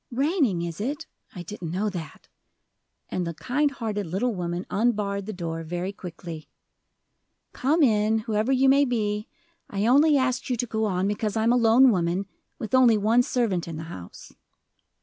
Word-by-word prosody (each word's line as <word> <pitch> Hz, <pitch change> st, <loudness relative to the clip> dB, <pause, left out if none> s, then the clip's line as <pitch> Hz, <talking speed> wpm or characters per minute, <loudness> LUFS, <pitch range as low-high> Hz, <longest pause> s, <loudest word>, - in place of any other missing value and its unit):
"Raining, 265 Hz, -, +1 dB
is 170 Hz, +2 st, -5 dB
it? 290 Hz, +8 st, -3 dB, 0.3 s
I 180 Hz, -, -6 dB
didn't 175 Hz, -2 st, -7 dB
know 190 Hz, +6 st, -1 dB
that," 165 Hz, -6 st, -8 dB, 0.8 s
and 180 Hz, -2 st, -2 dB
the 170 Hz, -, -5 dB
kind 280 Hz, -, 0 dB
hearted 215 Hz, -7 st, -4 dB
little 210 Hz, +9 st, -1 dB
woman 175 Hz, -1 st, -3 dB
unbarred 205 Hz, -3 st, 0 dB
the -, -, -3 dB
door 165 Hz, -4 st, -4 dB
very 175 Hz, +4 st, -4 dB
quickly. 165 Hz, -5 st, -9 dB, 1.0 s
"Come 300 Hz, +5 st, +2 dB
in, 215 Hz, -3 st, +3 dB
whoever 220 Hz, +2 st, 0 dB
you 265 Hz, 0 st, +3 dB
may 275 Hz, +2 st, +5 dB
be; 210 Hz, -5 st, -1 dB, 0.4 s
I 200 Hz, +1 st, -1 dB
only 290 Hz, +5 st, +5 dB
asked 260 Hz, -1 st, -1 dB
you 250 Hz, -, +1 dB
to 245 Hz, -, -1 dB
go 220 Hz, -1 st, -1 dB
on 190 Hz, -2 st, 0 dB
because 210 Hz, +1 st, -2 dB
I 220 Hz, -, +1 dB
am 230 Hz, +2 st, +4 dB
a -, -, +3 dB
lone 245 Hz, +2 st, +6 dB
woman, 180 Hz, 0 st, 0 dB, 0.3 s
with 220 Hz, -, -7 dB
only 250 Hz, -4 st, +6 dB
one 220 Hz, +4 st, +3 dB
servant 225 Hz, -9 st, -1 dB
in 165 Hz, -2 st, -6 dB
the 160 Hz, -, -6 dB
house." 90 Hz, -1 st, -11 dB
215 Hz, 175 wpm, -25 LUFS, 180-245 Hz, 1.0 s, lone